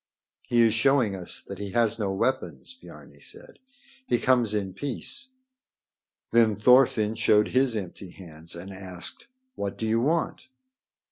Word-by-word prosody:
"He 120 Hz, -1 st, +3 dB
is 115 Hz, -2 st, +3 dB
showing 120 Hz, -3 st, +2 dB
us 90 Hz, -2 st, -4 dB
that -, -, -9 dB
he 100 Hz, -2 st, -6 dB
has 115 Hz, -1 st, +2 dB
no 100 Hz, -3 st, -1 dB
weapons," 130 Hz, -, -2 dB
Biarni 255 Hz, -, -15 dB
said. 485 Hz, +3 st, -12 dB, 0.5 s
"He 120 Hz, -, +2 dB
comes 120 Hz, -4 st, +2 dB
in 95 Hz, -3 st, -2 dB
peace." 145 Hz, -, -4 dB, 1.0 s
Then 115 Hz, -2 st, +4 dB
Thorfinn 110 Hz, -2 st, +4 dB
showed 105 Hz, -2 st, +3 dB
his 130 Hz, -2 st, +2 dB
empty 95 Hz, -2 st, -6 dB
hands 85 Hz, -2 st, -10 dB
and 95 Hz, +3 st, -9 dB
asked: 95 Hz, -, -5 dB, 0.3 s
"What 100 Hz, -, -5 dB
do 110 Hz, -, -3 dB
you 115 Hz, +1 st, +1 dB
want?" 160 Hz, -, -1 dB
110 Hz, 145 wpm, -26 LUFS, 100-130 Hz, 1.0 s, Then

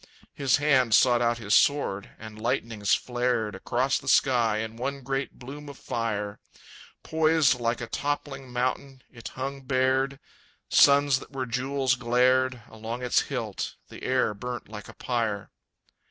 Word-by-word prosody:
His 135 Hz, -3 st, +2 dB
hand 130 Hz, -6 st, +3 dB
sought 120 Hz, -1 st, +4 dB
out 120 Hz, 0 st, +2 dB
his 105 Hz, -3 st, -2 dB
sword, 120 Hz, -9 st, +2 dB
and 110 Hz, -1 st, -10 dB
lightnings 115 Hz, -6 st, 0 dB
flared 120 Hz, -3 st, -1 dB
Across 125 Hz, +7 st, 0 dB
the -, -, -13 dB
sky 120 Hz, -5 st, +3 dB
in 110 Hz, +1 st, -4 dB
one 135 Hz, +3 st, -4 dB
great 135 Hz, +1 st, -3 dB
bloom 145 Hz, +3 st, -9 dB
of 140 Hz, -, -10 dB
fire. 105 Hz, -3 st, -3 dB, 0.6 s
Poised 160 Hz, -5 st, +3 dB
like 120 Hz, 0 st, -1 dB
a -, -, -3 dB
toppling 135 Hz, +1 st, -4 dB
mountain, 130 Hz, +2 st, -2 dB
it 115 Hz, -3 st, -9 dB
hung 135 Hz, +1 st, -4 dB
bared; 130 Hz, +1 st, +1 dB, 0.5 s
Suns 140 Hz, -1 st, +5 dB
that -, -, -13 dB
were 130 Hz, -1 st, -2 dB
jewels 130 Hz, +2 st, 0 dB
glared 125 Hz, 0 st, +2 dB
Along 115 Hz, +3 st, -6 dB
its 125 Hz, -, +3 dB
hilt. -, -, -4 dB
The -, -, -11 dB
air 130 Hz, -4 st, +1 dB
burnt 120 Hz, +3 st, -6 dB
like 105 Hz, -1 st, -9 dB
a -, -, -12 dB
pyre. 110 Hz, -5 st, -2 dB
125 Hz, 150 wpm, -27 LUFS, 115-135 Hz, 0.6 s, Suns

